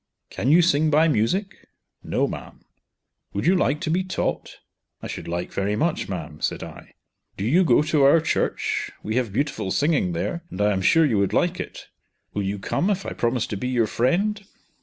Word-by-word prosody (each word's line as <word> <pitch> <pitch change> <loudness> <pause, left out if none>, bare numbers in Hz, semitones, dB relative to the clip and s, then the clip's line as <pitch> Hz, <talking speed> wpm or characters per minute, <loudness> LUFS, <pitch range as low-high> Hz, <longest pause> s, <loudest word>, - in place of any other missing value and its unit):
"Can 130 - -1
you 170 +4 +6
sing 155 -2 +3
by 155 +2 +4
music?" 185 - -1 0.4
"No - - 0
ma'am." - - -8 0.7
"Would 100 - -2
you 180 +3 +4
like 150 -5 +1
to 160 -2 -1
be 180 +3 +1
taught?" 185 - -3 0.4
"I - - -10
should - - -6
like 85 +1 -4
very 100 +1 0
much, 155 +2 -1
ma'am," 80 -5 -6
said - - -2
I. - - -11 0.4
"Do 100 - -3
you 165 +11 +4
go 150 -3 +4
to 155 -1 +1
our 140 +4 +6
church? 160 - -1
we 110 +3 -2
have 120 -5 0
beautiful 135 -3 -2
singing 140 - +1
there, 170 - -3
and 95 - -8
I 105 0 +3
am 95 - -1
sure 165 - +5
you 115 -8 +1
would 100 - 0
like - - +1
it. - - -7 0.5
Will 105 - -1
you 100 +1 -2
come 175 - -1
if 195 -2 -1
I - - -4
promise 120 0 0
to 105 - -5
be 125 - -3
your 125 -3 +2
friend? 195 - 0
135 Hz, 200 wpm, -23 LUFS, 105-165 Hz, 0.7 s, you